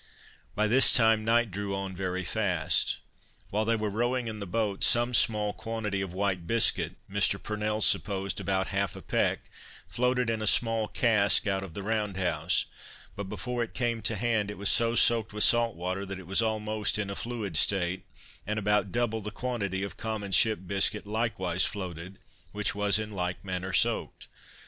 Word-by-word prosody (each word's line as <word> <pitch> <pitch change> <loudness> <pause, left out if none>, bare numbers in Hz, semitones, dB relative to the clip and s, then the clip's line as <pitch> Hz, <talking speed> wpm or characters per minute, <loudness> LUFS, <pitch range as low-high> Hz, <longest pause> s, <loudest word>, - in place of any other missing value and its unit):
By 105 - +2
this 130 +5 +5
time 110 -2 +4
night 115 0 +2
drew 100 +1 -3
on 95 -1 -5
very 95 0 -3
fast. 90 -5 +1 0.5
While 110 +2 +1
they 115 +1 +2
were 110 -2 -2
rowing 120 +3 -1
in 110 -1 -5
the 100 - -6
boat, 105 0 -1
some 120 +1 +4
small 105 -3 +3
quantity 110 -4 -4
of 95 -2 -4
white 95 -2 -2
biscuit 95 -7 +1
(Mr. 100 0 +2
Purnell 105 0 -3
supposed 100 -2 +1
about 95 -1 -1
half 100 0 0
a - - -10
peck,) - - 0 0.4
floated 125 0 0
in 115 -1 -1
a 110 - -1
small 115 0 +2
cask, 105 -3 +3
out 95 -2 -1
of 90 -4 -10
the 100 - -5
round 105 -2 -2
house; 85 -2 0 0.5
but 100 - -5
before 125 +2 -3
it 110 -5 -4
came 115 -1 -1
to 110 +2 0
hand, 110 -1 0
it 105 - -7
was 100 0 +2
so 115 0 +4
soaked 115 -2 +3
with 105 - +2
salt 120 -1 +3
water, 90 +3 -3
that 95 -1 -6
it 95 - -11
was 95 +5 +1
almost 110 -2 -1
in 100 -2 -3
a - - -5
fluid 110 -7 -5
state: 90 +2 +1 0.4
and 105 +1 -2
about 105 -2 +1
double 115 -1 -1
the 105 - -5
quantity 105 -4 -3
of 100 - -6
common 110 -3 -4
ship 110 0 +4
biscuit 100 +3 +1
likewise 105 -5 0
floated, 90 -2 -4 0.4
which 105 0 -1
was 105 0 +2
in 110 0 -5
like 90 -1 -4
manner 95 0 -4
soaked. 90 - 0
105 Hz, 185 wpm, -28 LUFS, 95-110 Hz, 0.5 s, this